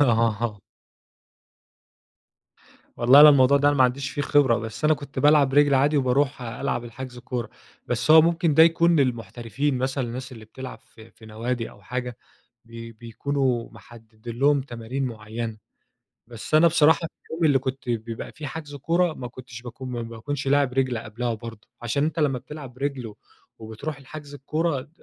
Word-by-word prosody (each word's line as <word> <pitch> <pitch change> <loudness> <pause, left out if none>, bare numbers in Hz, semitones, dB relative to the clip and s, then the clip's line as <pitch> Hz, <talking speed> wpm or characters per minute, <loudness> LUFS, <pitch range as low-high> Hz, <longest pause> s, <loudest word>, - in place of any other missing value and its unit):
آه 115 -4 +1 2.4
والله 130 +4 +7
أنا 150 - +11
الموضوع 140 -1 +6
ده 145 - +3
أنا 145 - +2
ما 130 - +5
عنديش 130 +2 -1
فيه 145 - -3
خبرة، 140 -6 +3
بس 110 +6 -7
أنا 155 - +5
كنت 140 -1 -9
بالعب 145 -2 +4
رِجل 145 -1 +5
عادي، 145 +3 +3
وباروح 135 0 +1
ألعب 120 +1 -3
الحجز 125 +1 -9
كورة. 120 -1 -5 0.4
بس 140 - -1
هو 160 0 +9
ممكن 170 -2 +1
ده 160 - +7
يكون 170 0 +4
للمحترفين 125 +1 -1
مثلًا 130 +1 -1
الناس 130 +3 -6
اللي 110 -3 -11
بتلعب 130 +4 -9
في 110 0 -17
في 110 - -17
نوادي 115 +2 -4
أو 100 - -18
حاجة 125 +3 -5 0.5
بي 115 0 -9
بيكونوا 120 +2 -2
محددين 115 0 -12
لهم 140 0 +4
تمارين 125 +1 -5
معينة، 110 -1 -5 0.7
بس 115 +5 -7
أنا 155 +2 +7
بصراحة 160 -2 +5
في - - -14 0.2
اليوم 165 +1 -2
اللي 145 -4 +4
كنت 130 0 -5
بيبقى 115 -1 -4
فيه 155 -1 -8
حجز 145 0 -7
كورة 165 +4 +1
ما 125 -4 -7
كنتش 120 -1 -11
باكون 125 +2 -8
ما 120 -1 -3
ما 115 - -7
باكونش 135 +4 -5
لاعب 140 -2 +2
رِجل 130 -3 0
قبلها 115 +2 -4
برضه، 110 -1 -10
عشان 140 +5 0
أنتَ 155 +1 -3
لما 140 -5 +1
بتلعب 135 -2 -10
رِجل، 135 -3 -3
و 105 -2 -11 0.4
وبتروح 115 +7 -6
الحجز 145 +1 -10
الكورة 150 +1 -1
ت 145 - -19
130 Hz, 175 wpm, -24 LUFS, 115-145 Hz, 2.4 s, أنا